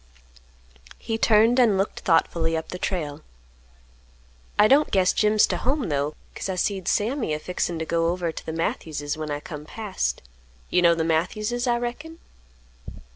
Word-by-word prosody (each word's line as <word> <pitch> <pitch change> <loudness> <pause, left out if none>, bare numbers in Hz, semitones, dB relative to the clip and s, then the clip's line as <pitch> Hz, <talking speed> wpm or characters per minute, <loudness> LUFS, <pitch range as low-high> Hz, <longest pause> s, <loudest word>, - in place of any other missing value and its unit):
He 225 -1 -4
turned 225 +3 +4
and 220 -6 +4
looked 195 +2 -1
thoughtfully 165 -1 +1
up 160 - -5
the 180 - -6
trail. 155 -6 -3 1.4
"I 210 - +6
don't 285 +5 +4
guess 185 -2 +3
Jim's 210 0 +4
to - - -2
home 265 - -1
though; 145 +1 -1 0.2
'cause - - -5
I 190 - -1
see'd 190 0 -1
Sammy 220 - 0
a - - -5
fixin' 175 0 -2
t' 160 - -3
go 165 0 +1
over 175 -1 -1
t' - - -8
th' - - -6
Matthews's 155 -3 -2
when 155 -1 -5
I 145 0 -2
come 150 -1 -8
past. 210 +5 -3 0.5
You 180 - +3
know 170 -1 +5
the 165 - 0
Matthews's, 210 +10 -1
I 240 -1 +2
reckon?" 270 +8 -5
180 Hz, 170 wpm, -24 LUFS, 160-225 Hz, 1.4 s, I